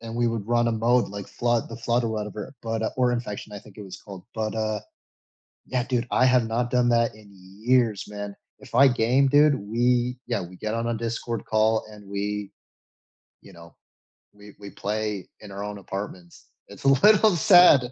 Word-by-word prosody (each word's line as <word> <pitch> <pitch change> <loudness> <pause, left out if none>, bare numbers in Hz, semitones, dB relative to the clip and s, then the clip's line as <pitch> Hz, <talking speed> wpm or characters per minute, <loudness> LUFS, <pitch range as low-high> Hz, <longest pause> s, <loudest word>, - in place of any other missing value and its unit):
and 115 0 -8
we 120 0 +1
would 115 -3 -3
run 120 0 +2
a - - 0
mode 120 +2 +2
like 100 -1 -7
Flood 120 -1 -1
The - - -8
Flood 120 +1 0
or - - 0
whatever, 105 -1 -5
but, 115 -1 -3
uh 110 - -1
or 125 -1 +2
Infection, 105 -3 -5
I 105 - -6
think 100 0 -17
it 105 - -8
was 95 - -10
called, 95 -3 -11
but, 110 -1 -2
uh, 110 -1 -1 0.9
yeah, 125 -1 -1
dude, 125 -1 -2
I 130 - +3
have 125 -2 +3
not 120 +2 -1
done 125 -1 +2
that 115 -1 +2
in 105 -1 -17
years, 105 +4 0
man. 100 -1 -7 0.2
If - - -15
I 135 +3 +7
game, 125 +2 +2
dude, 145 +2 +5
we 120 +3 0
yeah 115 -6 -1 0.2
get 110 0 -3
on 115 0 -2
a 120 - 0
Discord 115 0 -4
call 110 0 +2
and 105 -1 -14
we 100 0 -4 0.9
you 100 - -16
know, 85 -1 -15 0.6
we 105 0 -15
we 100 -1 -9
play 105 -2 -3
in 105 -2 -11
our 100 +1 -6
own 105 0 -5
apartments. 95 -3 -8 0.2
It's - - -13
a - - +6
little 210 - +5
sad 170 - +6
115 Hz, 200 wpm, -25 LUFS, 105-120 Hz, 0.9 s, I